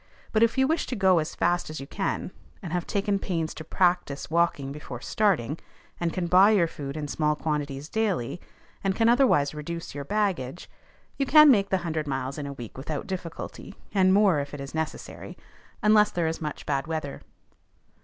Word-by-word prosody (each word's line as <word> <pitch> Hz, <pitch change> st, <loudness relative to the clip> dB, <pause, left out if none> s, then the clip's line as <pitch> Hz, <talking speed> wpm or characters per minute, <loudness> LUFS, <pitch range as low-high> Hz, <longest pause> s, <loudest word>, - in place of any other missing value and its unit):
But 215 Hz, -, +2 dB
if 230 Hz, +1 st, +3 dB
you 265 Hz, -, +4 dB
wish 320 Hz, +4 st, 0 dB
to 255 Hz, -, -3 dB
go 190 Hz, -4 st, +4 dB
as 155 Hz, -, -4 dB
fast 175 Hz, 0 st, +1 dB
as 155 Hz, -, -6 dB
you 135 Hz, -, -6 dB
can, 195 Hz, +3 st, -3 dB, 0.3 s
and 170 Hz, -2 st, -5 dB
have 175 Hz, -1 st, -2 dB
taken 200 Hz, -1 st, 0 dB
pains 165 Hz, -5 st, -2 dB
to 155 Hz, -, -8 dB
practise 175 Hz, -4 st, 0 dB
walking 165 Hz, -5 st, +1 dB
before 140 Hz, -4 st, -7 dB
starting, 165 Hz, -, 0 dB, 0.4 s
and 170 Hz, -1 st, 0 dB
can 180 Hz, +2 st, -2 dB
buy 185 Hz, +4 st, +6 dB
your 200 Hz, -6 st, +4 dB
food 145 Hz, -3 st, -6 dB
in 150 Hz, -1 st, -3 dB
small 150 Hz, +1 st, 0 dB
quantities 150 Hz, -2 st, -3 dB
daily, 185 Hz, -, -1 dB, 0.4 s
and 195 Hz, -1 st, +1 dB
can 225 Hz, +1 st, +3 dB
otherwise 235 Hz, -, +4 dB
reduce 165 Hz, +3 st, -6 dB
your 145 Hz, 0 st, -5 dB
baggage, 180 Hz, -6 st, -2 dB, 0.5 s
you 275 Hz, -, 0 dB
can 305 Hz, 0 st, +8 dB
make 200 Hz, -5 st, +3 dB
the 190 Hz, -, +2 dB
hundred 155 Hz, -2 st, -2 dB
miles 135 Hz, +1 st, -3 dB
in 145 Hz, -, -4 dB
a 140 Hz, -, -5 dB
week 120 Hz, -1 st, -9 dB
without 145 Hz, +2 st, -4 dB
difficulty, 185 Hz, 0 st, -7 dB, 0.2 s
and 190 Hz, -2 st, +4 dB
more 195 Hz, -5 st, +4 dB
if 145 Hz, +1 st, -5 dB
it -, -, -8 dB
is 140 Hz, 0 st, -7 dB
necessary, 160 Hz, -1 st, -5 dB, 0.5 s
unless 210 Hz, 0 st, +5 dB
there 170 Hz, -2 st, -1 dB
is 160 Hz, +1 st, -2 dB
much 150 Hz, -1 st, -5 dB
bad 140 Hz, 0 st, -1 dB
weather. 155 Hz, -3 st, -4 dB
165 Hz, 195 wpm, -26 LUFS, 145-195 Hz, 0.5 s, can